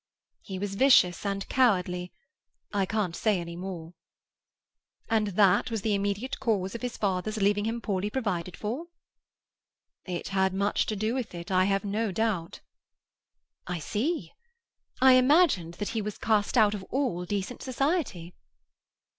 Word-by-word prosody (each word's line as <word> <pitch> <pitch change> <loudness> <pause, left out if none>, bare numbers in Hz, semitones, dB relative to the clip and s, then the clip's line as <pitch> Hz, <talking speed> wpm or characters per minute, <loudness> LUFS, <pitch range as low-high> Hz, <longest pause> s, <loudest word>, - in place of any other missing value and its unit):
"He 190 - -6
was 200 +1 -3
vicious 200 -6 +4
and 195 0 -3
cowardly—I 195 -1 -1
can't 205 -5 -1
say 210 -4 +1
any 170 0 -6
more." 175 -2 -7 1.2
"And 220 -2 +2
that 200 +4 +4
was 225 -4 -3
the 215 - +1
immediate 200 +5 -2
cause 205 -7 0
of 235 - -6
his 245 -2 -4
father's 200 +2 -1
leaving 205 0 +2
him 230 +1 -2
poorly 200 -2 -1
provided 185 -8 -3
for?" 245 +11 -4 1.2
"It 180 -2 -4
had 190 -1 +1
much 200 +1 +1
to 215 - -1
do 215 +3 -1
with 250 -8 -4
it, 170 +2 -7
I 185 0 +4
have 195 +1 0
no 210 +1 -1
doubt." 195 -5 -2 1.1
"I 180 - -2
see. 210 - -2 0.7
I 260 0 +7
imagined 255 - +3
that 205 - -4
he 225 -1 -2
was 210 0 -5
cast 215 0 +1
out 215 -2 +5
of 205 - -4
all 250 -10 -1
decent 200 +5 -3
society." 260 - -1
205 Hz, 145 wpm, -28 LUFS, 185-230 Hz, 1.2 s, I